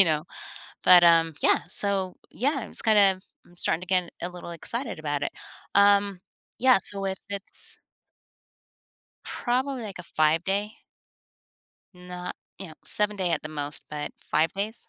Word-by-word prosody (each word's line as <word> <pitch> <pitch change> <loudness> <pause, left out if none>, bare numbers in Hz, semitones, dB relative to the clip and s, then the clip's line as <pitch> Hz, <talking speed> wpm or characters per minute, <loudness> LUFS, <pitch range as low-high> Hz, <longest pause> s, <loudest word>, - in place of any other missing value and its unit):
you 195 - +9
know, 155 -2 0 0.6
but, 180 -1 +9
um, 165 -2 +5
yeah, - - +4
so, 190 -1 -1 0.2
yeah, 280 +6 0
I'm, 230 - -8
just, - - -5
kinda, 200 -4 +5 0.3
I'm 175 - -21
starting 165 - 0
to - - -7
get 180 -2 +1
a 175 - -1
little 175 -1 -9
excited 230 - -3
about 145 -2 -2
it. - - -3 0.4
Um, 200 -1 +4 0.4
yeah, 255 -3 +6
so 195 +1 -2
if 190 -1 -3
it's 200 -1 -4 1.5
Probably, 255 +1 -1
like, 200 -4 -7
a - - -6
five-day. 175 +6 +1 1.2
Not 180 0 -7 0.2
you 190 -1 -8
know, 155 - -12
seven-day 205 -4 +1
at 165 - 0
the 155 - -6
most, 145 -1 -3
but 150 -1 -5
5 155 +1 0
days, 210 +4 -5
185 Hz, 155 wpm, -26 LUFS, 165-205 Hz, 1.5 s, you